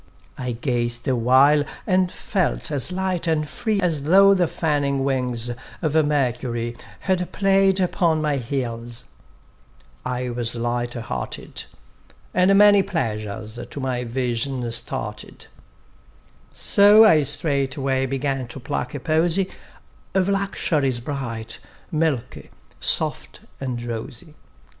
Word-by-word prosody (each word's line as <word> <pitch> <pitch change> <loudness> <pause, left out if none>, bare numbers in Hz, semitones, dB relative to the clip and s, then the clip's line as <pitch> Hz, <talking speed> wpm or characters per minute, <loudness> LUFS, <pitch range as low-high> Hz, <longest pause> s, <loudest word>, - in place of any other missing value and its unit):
I 125 -2 -3
gazed 120 0 -2
awhile, 130 +4 +4 0.2
and 185 -2 +2
felt 185 -4 -1
as 145 +3 +2
light, 185 -2 -1
and 155 -2 +1
free 215 +6 -1
As 170 -6 +1
though 195 +4 +7
the 180 -3 +2
fanning 145 -4 0
wings 125 -3 0 0.3
of 155 -4 -1
Mercury 125 -6 0 0.3
Had 185 -2 -1
played 195 -1 +3
upon 170 -3 +2
my 150 -2 0
heels: 120 -2 -4 1.0
I 125 0 -3
was 120 -1 -3
light 120 +1 -2
hearted, 65 - -5 0.7
And 185 +2 +4
many 205 -1 +7
pleasures 110 - -3
to - - -6
my 130 -2 -2
vision 125 0 -2
started; 115 -2 -6 1.1
So 205 +2 +6
I 160 -8 +6
straightway 140 -2 0
began 135 -1 -2
to 120 +3 -9
pluck 125 +1 -4
a - - -3
posey 165 +6 +1 0.6
Of 190 -1 +3
luxuries 160 -10 0
bright, 120 -4 -5 0.3
milky, 150 -6 -1 0.3
soft - - -1 0.2
and 125 -3 -3
rosy. 120 +6 -6
140 Hz, 115 wpm, -23 LUFS, 120-170 Hz, 1.1 s, though